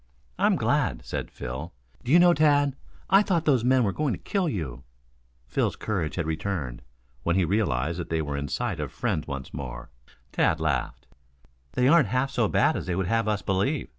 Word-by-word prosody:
"I'm - - +4
glad," - - 0
said - - -4
Phil, 65 +8 -6 0.3
"do 125 - -3
you 165 - +8
know, 175 0 +6
Tad, 145 -3 +3 0.4
I 195 +1 +7
thought 175 -6 0
those 130 -6 +3
men 130 0 +4
were 100 - +1
going 145 +4 -1
to - - -4
kill 190 -4 -1
you." 70 - -4 0.6
Phil's 60 - -1
courage 90 -8 -2
had 85 - -1
returned, 80 -6 -3 0.4
when 85 +6 0
he 95 -2 +3
realized 85 - 0
that 85 - -5
they 80 - 0
were 75 -1 -3
in 70 0 -3
sight 105 - -2
of 75 -4 -4
friends 75 - -2
once 70 -2 -6
more. 65 -3 -7 0.4
Tad 80 - +2
laughed. 70 -6 -2 0.7
"They 125 - +2
aren't 155 -3 +5
half 130 +5 0
so 120 -5 +1
bad - - +2
as - - -4
they 90 - -1
would 95 0 0
have 115 +3 +1
us 105 -3 0
believe. 100 +10 0
95 Hz, 195 wpm, -26 LUFS, -, 0.7 s, you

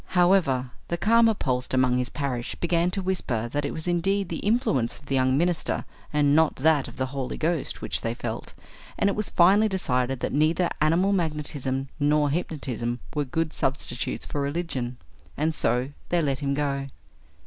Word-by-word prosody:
However, 165 -9 +3 0.2
the 170 - -2
calmer 225 +3 +4
pulsed 125 -5 -1
among 125 -1 +3
his 125 - -1
parish 130 -5 -3
began 170 0 +1
to 190 +1 -2
whisper 130 -12 -1
that 145 +3 -2
it - - -2
was 160 +1 -5
indeed 190 +2 +1
the 165 - -3
influence 205 - +1
of - - -19
the 135 - -3
young 130 0 +3
minister 175 +1 0 0.3
and 145 -1 +3
not 160 -1 +4
that 150 0 +3
of - - -11
the 130 - 0
Holy 135 -2 -3
Ghost 160 -1 -1
which - - 0
they 115 +1 -2
felt, 115 -2 -5 0.4
and 200 - +3
it - - -3
was 210 -1 -2
finally 200 +5 +5
decided 130 -9 0
that - - -2
neither 160 +4 +2
animal 170 +6 +3
magnetism 150 -6 -2
nor 145 0 +3
hypnotism 130 -7 -3
were 150 -1 0
good 160 +4 -2
substitutes 135 -1 -2
for 145 - -3
religion. 140 -5 -2 0.4
And 155 +2 +1
so 125 -3 +1 0.2
they 175 - +2
let 140 -5 0
him 140 -1 -1
go. 140 -1 -1
150 Hz, 180 wpm, -26 LUFS, 130-175 Hz, 0.4 s, finally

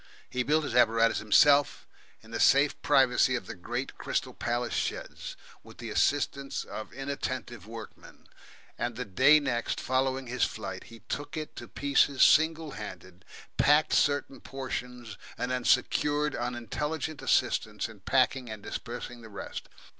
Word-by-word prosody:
He 125 - -2
built 150 +4 +2
his 145 - -4
apparatus 115 -1 +4
himself 140 +6 +4 0.4
in 110 - -15
the 115 - -3
safe 140 +1 +4
privacy 130 0 +4
of 120 - -4
the - - -6
great 120 +8 -5
Crystal - - -2
Palace 120 0 -2
sheds, - - -4 0.2
with 115 0 -15
the 115 -2 -7
assistance 140 +3 0
of 110 - -8
inattentive 130 -4 -5
workmen, 115 -1 -11 0.5
and 120 -1 -2
the 125 +1 -4
day 130 +10 +5
next 120 -5 -2
following 130 +1 0
his 125 +1 -1
flight - - -4
he 115 -2 -14
took 145 +8 -5
it 155 -1 -6
to - - -7
pieces 140 -1 +2
single 160 0 +4
handed, 95 -5 -9 0.3
packed 150 +3 +4
certain 145 -1 +1
portions, 125 -4 -6 0.2
and 125 - -2
then 125 -1 -1
secured 150 +3 +2
unintelligent 140 +6 -3
assistance - - +1
in - - -14
packing 130 -3 +1
and 110 -2 -8
dispersing 120 0 -6
the 110 - -12
rest. 100 - -7
125 Hz, 145 wpm, -29 LUFS, 115-140 Hz, 0.5 s, day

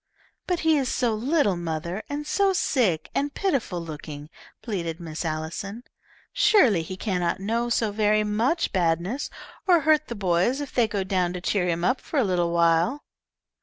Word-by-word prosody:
"But 360 -2 0
he 320 -1 +3
is 260 -2 -1
so 240 -3 +1
little, 240 - +1
mother, 170 +3 -4
and 290 +1 -4
so 390 +5 +2
sick 230 - +1
and 285 +1 0
pitiful 270 - -1
looking," 150 -2 -8 0.3
pleaded 170 -7 -3
Miss 160 -2 -5
Allison. 165 +8 -4 0.5
"Surely 380 - +4
he 185 +3 -7
cannot 180 -5 -1
know 230 +4 -1
so 225 -2 +1
very 215 0 +2
much 225 +10 0
badness 180 - 0 0.4
or 350 -3 +5
hurt 310 0 +3
the 235 - -5
boys 190 +6 +1
if 285 -2 -6
they 240 -3 +3
go 205 -2 -2
down 185 -2 0
to 180 - -4
cheer 180 -1 0
him 170 0 -1
up 255 +7 +1
for 310 - -4
a 270 - +4
little 175 -4 +1
while." 170 - +2
205 Hz, 170 wpm, -25 LUFS, 170-260 Hz, 0.5 s, or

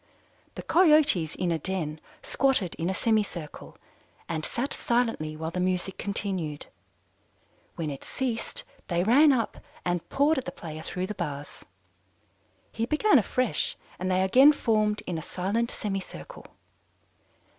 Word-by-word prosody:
"The - - -6
Coyotes 305 - +5
in 180 -2 -1
a 165 - 0
den, 160 -3 -3 0.2
squatted 260 -10 +1
in 170 +2 0
a - - 0
semicircle, 205 -9 -2 0.5
and 160 -2 -3
sat 250 - -2
silently 225 -11 0
while 160 +1 -4
the 180 - -3
music 185 +1 -1
continued. 185 -7 -2 1.1
When 155 -3 -3
it 135 - -8
ceased, 245 -4 -3 0.2
they 175 -1 +1
ran 280 +9 +6
up 235 -4 -1 0.3
and 175 -1 -1
pawed 290 +1 +3
at 260 - -8
the - - -4
player 155 -2 -8
through 180 +3 -3
the 210 - -4
bars. 145 -6 -6 1.1
He 230 +1 -2
began 305 +3 +4
afresh, 250 +3 -1 0.2
and 185 +1 -2
they 185 0 +2
again 265 +10 +7
formed 215 -5 +1
in 170 -3 -3
a - - -6
silent 200 +8 -1
semicircle. 195 - -6
190 Hz, 140 wpm, -27 LUFS, 170-240 Hz, 1.1 s, again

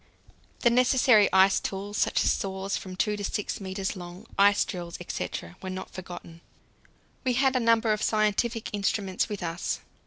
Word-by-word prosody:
The 240 - +4
necessary 250 -3 +5
ice 190 +1 +5
tools, 200 +1 -5
such - - +2
as - - +3
saws 195 0 -2
from 185 -1 -6
2 210 +2 0
to 205 - -5
6 205 +1 -3
metres 190 +1 -3
long, 180 +3 -9
ice 205 +1 +4
drills, 175 -2 -6
etc., 85 +1 -5
were 190 - -5
not 185 0 -6
forgotten. 175 -2 -9 0.8
We 255 -2 +1
had 265 +1 +2
a - - +3
number 230 -1 +3
of 210 - -3
scientific 215 +2 0
instruments 195 -2 -1
with 205 -3 -4
us. 170 +1 -3
200 Hz, 165 wpm, -27 LUFS, 185-220 Hz, 0.8 s, necessary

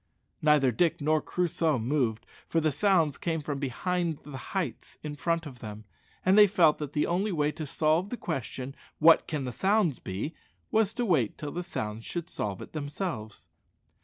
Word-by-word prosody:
Neither 150 -4 +4
Dick 165 +8 +1
nor 155 +1 +2
Crusoe 165 -4 0
moved, 120 -2 0 0.2
for 165 - +1
the 155 -1 +2
sounds 165 -3 +2
came 165 -2 -1
from 145 -2 -4
behind 165 +5 -1
the 145 -2 -9
heights 155 - -4
in 150 -1 -4
front 165 +2 -1
of 130 -5 -9
them, 105 -1 -8 0.4
and 185 +1 +5
they 210 0 +9
felt 170 -5 +4
that 150 -2 -5
the 150 - +2
only 190 +5 0
way 150 -3 +1
to 155 0 -6
solve 160 +6 +1
the 245 - -4
question, 135 - -4 0.2
"What 165 +1 +6
can 150 -4 -2
the 125 - -3
sounds 190 - +2
be?" 100 - -4 0.4
was 220 -2 +3
to 245 -1 0
wait 145 - +2
till 145 -1 -5
the 175 - -3
sounds 110 -9 -4
should 175 +5 -5
solve 100 -3 -3
it - - -13
themselves. 145 - -5
155 Hz, 185 wpm, -29 LUFS, 135-175 Hz, 0.4 s, they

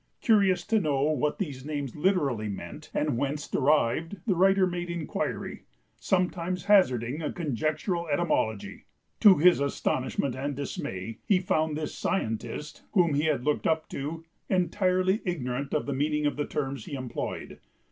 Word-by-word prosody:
Curious 195 -6 +3
to 220 -1 +2
know 140 -5 +1
what 150 0 0
these 140 -10 -4
names 145 -3 -4
literally 145 - +1
meant 100 - -7
and 145 -6 0
whence 145 +1 -2
derived, 150 +5 +1
the 200 - +2
writer 190 +2 +4
made 175 -1 -3
inquiry, 170 -3 -4 0.3
sometimes 180 0 0
hazarding 145 - +3
a 155 - -2
conjectural 160 - -1
etymology. 110 - -1 0.3
To 200 -3 +8
his 175 +2 +6
astonishment 135 -1 -1
and 140 +2 -3
dismay 115 -6 -5
he 200 - +5
found 155 -4 0
this 155 -1 -4
"scientist," 120 - -3
whom 175 -7 +4
he 145 +2 +1
had 150 -6 +1
looked 150 - +1
up 160 -1 +1
to, 155 +4 -5 0.3
entirely 185 +2 +2
ignorant 140 - -3
of 150 - 0
the 140 - -2
meaning 150 +2 0
of 145 - +1
the 145 - -2
terms 135 -5 -3
he - - -8
employed. 130 -2 -5
150 Hz, 150 wpm, -28 LUFS, 135-180 Hz, 0.3 s, To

